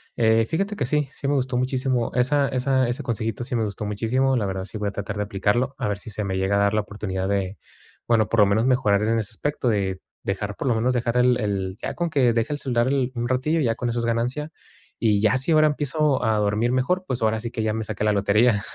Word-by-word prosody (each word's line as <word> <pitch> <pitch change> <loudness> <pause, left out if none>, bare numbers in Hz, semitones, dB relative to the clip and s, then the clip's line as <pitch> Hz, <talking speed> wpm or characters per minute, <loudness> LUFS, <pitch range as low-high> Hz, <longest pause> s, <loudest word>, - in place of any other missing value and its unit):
eh, 110 -1 +3
fíjate 195 +5 -1
que 145 - -1
sí, 150 +2 0
sí 140 - -5
me 145 - +2
gustó 130 -2 0
muchísimo, 130 -1 0
esa 140 +3 +2
esa 130 -1 +1
ese 120 - -2
consejito 115 -1 -3
sí 125 0 -4
me 115 - +1
gustó 105 0 -4
muchísimo, 120 +6 +1
la 110 -5 0
verdad, 95 -1 -3
sí 100 - -7
voy 105 -1 -1
a - - -7
tratar 100 0 -5
de 105 - 0
aplicarlo, 105 +6 0
a - - -2
ver 105 - -1
si 115 - -8
se 105 +1 -3
me 95 -1 -2
llega 95 +1 +1
a 100 - +3
dar 100 +1 +2
la 105 - +2
oportunidad 95 -2 -4
de 100 -1 -1 0.5
bueno, 115 -3 +3
por 115 -1 +3
lo 105 - +7
menos 110 +4 +2
mejorar 105 -6 +3
en 115 +1 +1
ese 105 -2 -4
aspecto, 145 -4 -2
de 95 -4 -1 0.2
dejar, 100 +1 -3
por 140 - -4
lo 120 - +2
menos, 120 +3 +1
dejar 120 0 0
el 125 0 +4
el 100 -3 -2
ya - - -3
con 170 -1 -2
que 130 -6 +3
deje 115 +6 0
el 145 - -4
celular 120 -1 +1 0.3
un 120 0 -2
ratillo, 130 +6 +1
ya 115 -6 +1
con 120 +1 -2
eso 120 0 -1
es 115 - -1
ganancia, 125 +7 -1 0.5
y 105 -3 +2
ya, 110 +4 +3
si 135 +6 0
ahora 155 -1 +5
empiezo 150 -1 +1
a 110 -2 +2
dormir 105 +3 +1
mejor, 135 +9 +1
pues, 125 -2 -2
ahora 110 0 +1
sí 115 +1 -5
que 110 - -3
ya 110 -1 0
me 110 - -2
saqué 105 -1 -4
la 105 - +3
lotería, 105 +2 +3
115 Hz, 260 wpm, -23 LUFS, 105-130 Hz, 0.5 s, lo